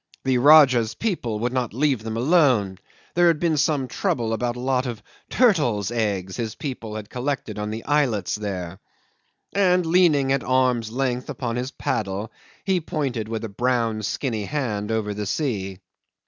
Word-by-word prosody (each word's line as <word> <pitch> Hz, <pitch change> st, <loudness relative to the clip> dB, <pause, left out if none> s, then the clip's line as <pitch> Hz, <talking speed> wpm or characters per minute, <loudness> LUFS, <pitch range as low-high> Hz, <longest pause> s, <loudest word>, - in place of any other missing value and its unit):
The 130 Hz, -2 st, +2 dB
Rajah's 130 Hz, -5 st, +6 dB
people 165 Hz, -, -2 dB
would 120 Hz, +3 st, -2 dB
not 125 Hz, -4 st, -2 dB
leave 135 Hz, -3 st, +1 dB
them 110 Hz, 0 st, -4 dB
alone; 125 Hz, -, +3 dB, 0.3 s
there 175 Hz, 0 st, +4 dB
had 165 Hz, -3 st, +3 dB
been 165 Hz, -2 st, +1 dB
some 145 Hz, -2 st, +1 dB
trouble 115 Hz, -2 st, -1 dB
about 120 Hz, +1 st, -1 dB
a -, -, -7 dB
lot 130 Hz, 0 st, 0 dB
of 120 Hz, -3 st, -6 dB, 0.3 s
turtles' 125 Hz, -, +2 dB
eggs 100 Hz, -5 st, -2 dB
his 115 Hz, -3 st, -3 dB
people 115 Hz, -6 st, -6 dB
had 105 Hz, -1 st, -6 dB
collected 125 Hz, -4 st, -3 dB
on 105 Hz, 0 st, -3 dB
the 110 Hz, +1 st, -6 dB
islets 135 Hz, -10 st, +1 dB
there 95 Hz, -4 st, -4 dB, 0.7 s
and 180 Hz, -3 st, +3 dB
leaning 160 Hz, -6 st, +3 dB
at 135 Hz, -1 st, +1 dB
arm's 125 Hz, -3 st, +1 dB
length 125 Hz, +1 st, -2 dB
upon 120 Hz, -3 st, -3 dB
his 125 Hz, +1 st, -2 dB
paddle, 105 Hz, -5 st, -3 dB, 0.3 s
he 190 Hz, -3 st, +1 dB
pointed 135 Hz, -9 st, -3 dB
with 115 Hz, -1 st, -3 dB
a -, -, -2 dB
brown 115 Hz, 0 st, 0 dB
skinny 110 Hz, 0 st, -2 dB
hand 110 Hz, -7 st, -2 dB
over 110 Hz, -2 st, -1 dB
the 105 Hz, 0 st, -4 dB
sea. 95 Hz, -, -2 dB
120 Hz, 165 wpm, -23 LUFS, 110-140 Hz, 0.7 s, Rajah's